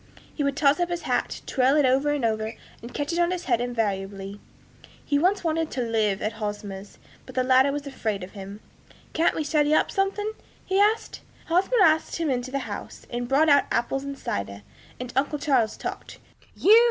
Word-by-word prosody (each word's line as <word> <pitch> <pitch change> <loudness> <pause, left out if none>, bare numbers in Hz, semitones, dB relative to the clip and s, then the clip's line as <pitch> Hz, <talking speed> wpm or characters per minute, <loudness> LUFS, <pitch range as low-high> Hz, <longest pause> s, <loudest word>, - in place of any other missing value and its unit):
He 295 - -2
would 280 0 0
toss 290 +2 +4
up 350 0 +1
his 345 0 -3
hat, - - -1
twirling 270 +2 +3
it - - +5
over 270 +3 +2
and 290 -5 0
over, 220 0 -1 0.3
and 235 - -9
catch 290 +5 -3
it 340 - 0
on 345 0 +3
his 360 -1 -3
head 240 -3 +2
invariably. 200 -4 -3 0.7
He 285 -1 +2
once 370 +5 +2
wanted 325 -1 0
to 255 - -2
live 215 -4 0
at 215 - -1
Hosmer's, 205 -1 -5 0.3
but 260 - -11
the 255 - +2
latter 260 +2 +4
was 290 0 -4
afraid 220 -8 -3
of 180 - -9
him. 200 +1 -9 0.5
'Can't 325 +1 +2
we 315 - -1
study 300 0 +2
up - - +2
something?' 395 +2 0 0.3
he 380 +1 +1
asked. 425 +2 +1 0.3
Hosmer 385 +6 +3
asked 315 0 +3
him 325 -4 0
into 250 0 -2
the 275 +1 -3
house, - - -7
and 240 0 -3
brought 280 +5 +3
out 285 -2 +5
apples 270 +3 0
and 280 0 -6
cider, 100 - -4 0.4
and 250 -1 -6
uncle 285 +3 +1
Charles 265 -7 +1
talked. - - -6 0.4
'You!' 435 +4 +7
270 Hz, 200 wpm, -25 LUFS, 225-315 Hz, 0.7 s, You